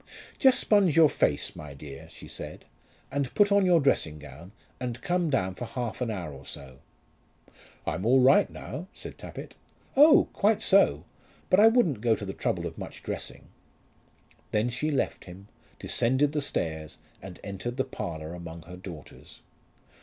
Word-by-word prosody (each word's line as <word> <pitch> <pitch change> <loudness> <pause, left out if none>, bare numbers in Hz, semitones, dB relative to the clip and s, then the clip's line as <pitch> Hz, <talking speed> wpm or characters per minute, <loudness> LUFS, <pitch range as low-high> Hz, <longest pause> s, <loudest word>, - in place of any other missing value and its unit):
"Just 260 -2 +5
sponge 195 -7 +3
your 160 -3 +6
face, 70 - 0
my 75 -2 -9
dear," 70 -1 -10
she - - -12
said, - - -7 0.5
"and 140 -2 -1
put 205 -1 +4
on 200 -2 +4
your 175 -2 +5
dressing 85 - +1
gown, 75 +5 -12 0.3
and 125 -2 -4
come 175 +4 0
down 95 -9 0
for 120 - -6
half 120 +1 -5
an 125 - 0
hour 90 -8 -4
or 70 0 -11
so." 65 -3 -10 1.1
"I'm 80 +4 -2
all 125 +4 +5
right 130 +2 +5
now," 175 +4 -7
said - - -9
Tappitt. - - -9 0.4
"Oh! 300 +3 +7
quite 210 +1 +2
so; 195 +1 +4 0.5
but 185 - +6
I 215 - +8
wouldn't 195 - +3
go 115 -1 +3
to 105 - -7
the 95 - -5
trouble - - -2
of - - -6
much - - -8
dressing." - - -6 1.0
Then 110 +3 +1
she 125 +6 -2
left 145 - -1
him, 95 +3 -12 0.3
descended 130 +5 +1
the 150 -1 -1
stairs, 80 - -3 0.2
and 95 -2 -10
entered 105 +5 -5
the 130 - +2
parlour 80 - -6
among 85 -1 -8
her 90 +2 -11
daughters. 90 -6 -11
120 Hz, 170 wpm, -28 LUFS, -, 1.1 s, I